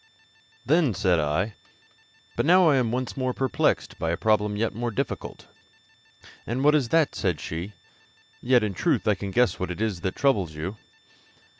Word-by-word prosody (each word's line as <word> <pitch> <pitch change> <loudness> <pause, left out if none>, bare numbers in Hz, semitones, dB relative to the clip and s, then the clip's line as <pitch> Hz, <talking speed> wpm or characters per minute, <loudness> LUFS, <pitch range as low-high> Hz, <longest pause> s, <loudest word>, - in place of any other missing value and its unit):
Then 155 - +2
said 95 -3 +2
I: 80 +8 -1 0.8
'But - - 0
now 180 -1 +6
I 140 - +4
am 120 -3 +1
once 125 0 -3
more 130 -2 -2
perplexed 130 -1 0
by 80 0 -1
a 85 - -1
problem 105 0 +1
yet 110 0 -1
more 120 +3 -3
difficult.' 105 - -5 1.0
'And 125 +4 -2
what 150 +1 +5
is 140 -6 +1
that?' 160 0 +2
said 90 -7 -1
she; 85 +8 -6 0.7
'yet, 125 -2 +3
in 105 -2 -2
truth, 135 - 0
I 105 - +5
can 100 +1 -5
guess 120 +4 +1
what 95 - -3
it 90 - -5
is 105 -6 -2
that 95 - -3
troubles 100 - +1
you.' 95 +8 -5
110 Hz, 175 wpm, -25 LUFS, 95-130 Hz, 1.0 s, now